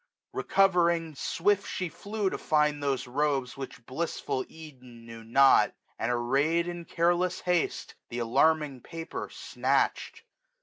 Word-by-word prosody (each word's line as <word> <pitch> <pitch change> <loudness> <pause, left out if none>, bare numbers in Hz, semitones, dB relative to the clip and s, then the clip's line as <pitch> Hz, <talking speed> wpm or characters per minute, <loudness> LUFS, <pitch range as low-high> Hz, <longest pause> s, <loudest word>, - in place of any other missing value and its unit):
Recovering, 170 -4 +2
swift 200 +7 0
she 185 - -2
flew 205 +3 -3
to - - -4
find 150 -1 +1
those 140 -2 -1
robes 135 0 -1
Which 135 -3 -8
blissful 130 -1 -3
Eden 130 -7 -13
knew 115 -1 -10
not; 135 +4 +5 0.2
and, 115 - 0
array'd 140 +8 +1
1350 175 - -3
In 175 -1 -8
careless 175 +2 +2
haste, 180 -2 -1 0.2
th' - - -5
alarming 140 +3 +2
paper 165 +3 -6
snatched. - - -1
150 Hz, 130 wpm, -28 LUFS, 130-170 Hz, 0.2 s, not